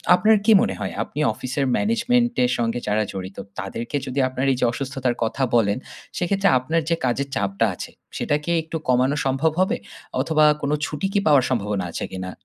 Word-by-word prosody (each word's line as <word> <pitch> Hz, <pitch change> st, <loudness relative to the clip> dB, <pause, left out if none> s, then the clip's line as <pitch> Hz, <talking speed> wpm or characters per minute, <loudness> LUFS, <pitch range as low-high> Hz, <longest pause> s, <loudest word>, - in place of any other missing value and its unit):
আপনার 215 Hz, +4 st, +4 dB
কি 225 Hz, -, +5 dB
মনে 235 Hz, -, 0 dB
হয়? -, -, -3 dB
আপনি -, -, -8 dB
অফিসের 130 Hz, +5 st, -2 dB
ম্যানেজমেন্ট 240 Hz, +2 st, +2 dB
এর 125 Hz, -, 0 dB
সঙ্গে 115 Hz, 0 st, 0 dB
যারা 105 Hz, +1 st, +2 dB
জড়িত, 95 Hz, 0 st, -7 dB, 0.2 s
তাদেরকে 115 Hz, +8 st, -5 dB
যদি 135 Hz, +1 st, -3 dB
আপনার 130 Hz, +1 st, -2 dB
এই -, -, -3 dB
যে -, -, +3 dB
অসুস্থতার 130 Hz, -1 st, -2 dB
কথা 125 Hz, +4 st, -1 dB
বলেন। 105 Hz, -2 st, +3 dB, 0.4 s
সেক্ষেত্রে 195 Hz, +2 st, +2 dB
আপনার 160 Hz, +6 st, 0 dB
যে 165 Hz, -, +3 dB
কাজের 135 Hz, +3 st, 0 dB
চাপটা 100 Hz, +2 st, +1 dB
আছে -, -, -7 dB, 0.3 s
সেটা 145 Hz, -, 0 dB
কি 170 Hz, -, -5 dB
একটু 160 Hz, +1 st, -4 dB
কমানো 130 Hz, +3 st, +3 dB
সম্ভব 135 Hz, +4 st, +2 dB
হবে? 190 Hz, -, +1 dB, 0.4 s
অথবা 155 Hz, -1 st, +3 dB, 0.2 s
কোন 140 Hz, -, -1 dB
ছুটি 150 Hz, +7 st, -2 dB
কি 205 Hz, -, +3 dB
পাওয়ার 140 Hz, -5 st, +5 dB
সম্ভাবনা 105 Hz, -6 st, -1 dB
আছে -, -, -4 dB
কিনা? 95 Hz, 0 st, -5 dB
130 Hz, 190 wpm, -23 LUFS, 115-160 Hz, 0.4 s, কি